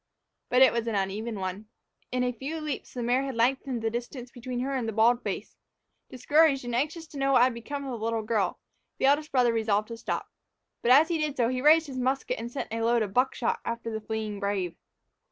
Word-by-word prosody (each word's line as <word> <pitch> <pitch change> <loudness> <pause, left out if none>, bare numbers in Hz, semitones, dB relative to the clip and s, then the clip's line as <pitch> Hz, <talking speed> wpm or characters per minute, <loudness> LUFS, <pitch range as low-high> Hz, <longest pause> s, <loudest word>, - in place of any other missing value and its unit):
But 250 +1 +6
it 260 - +6
was 235 0 -1
an 225 - -1
uneven 205 +3 -2
one. 190 +3 -4 0.4
In 250 0 0
a 250 - +1
few 275 +7 -5
leaps 305 -4 -5
the 245 - -3
mare 245 +3 +2
had 270 -2 -4
lengthened 250 0 0
the 225 - 0
distance 240 +1 -6
between 245 0 -5
her 275 +2 -2
and 255 -4 -1
the - - -1
bald 235 +3 +4
face. - - -5 0.5
Discouraged, 280 +1 +3
and 240 - -4
anxious 305 +7 -1
to 285 - -8
know 275 0 +2
what 245 - +6
had 255 0 +3
become 280 +5 -6
of 270 - -4
the - - -6
little 225 -1 -1
girl, 215 -4 0 0.4
the - - +1
eldest 290 +2 +3
brother 245 -3 +3
resolved 215 -1 0
to 230 - -6
stop. - - -3 0.5
But 235 - 0
as 290 +6 +7
he 335 -2 0
did 300 -2 -2
so, 235 -2 +2
he 255 0 -2
raised 315 +3 +6
his 265 -3 -6
musket 260 0 -1
and 235 +1 -6
sent 255 -4 -5
a 225 - -2
load 230 0 +3
of 200 -2 -5
buckshot 250 -1 +1
after 230 0 -4
the 220 0 -4
fleeting 215 -2 -4
brave. 195 -4 -2
245 Hz, 230 wpm, -28 LUFS, 225-270 Hz, 0.5 s, as